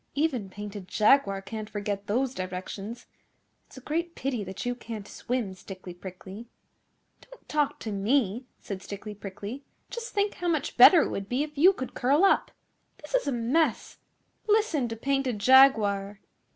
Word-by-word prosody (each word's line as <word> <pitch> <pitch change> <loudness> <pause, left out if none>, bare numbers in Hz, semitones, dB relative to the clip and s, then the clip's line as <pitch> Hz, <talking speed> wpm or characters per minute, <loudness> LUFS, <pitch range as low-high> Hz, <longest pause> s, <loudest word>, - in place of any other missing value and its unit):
'Even 275 -9 0
Painted 205 -1 -8
Jaguar 205 -2 +3
can't 215 +1 -6
forget 205 -1 -4
those 255 +5 0
directions. 190 +4 -6 0.6
It's - - -16
a - - -9
great 335 +5 -3
pity 255 -5 -2
that 190 +3 -7
you 245 - 0
can't 225 -4 -8
swim, 240 -6 -3
Stickly 185 -1 -10
Prickly.' 190 +5 -10 0.7
'Don't - - -17
talk 300 -2 0
to 220 - -4
me,' 225 +3 0
said 195 -2 -6
Stickly 205 +1 -7
Prickly. 205 +6 -8 0.3
'Just 470 0 -6
think 405 0 0
how 355 - -4
much 315 -4 -1
better 340 -5 +9
it - - -2
would 195 0 -5
be 255 +4 +1
if 300 0 -8
you 340 +7 +7
could 260 -10 -6
curl 280 +8 +2
up. - - +3 0.5
This - - -11
is - - +1
a - - +1
mess! 250 +3 0 0.5
Listen 415 - +2
to 225 - -5
Painted 270 0 -1
Jaguar. 205 -5 +5
235 Hz, 165 wpm, -27 LUFS, 200-280 Hz, 0.7 s, better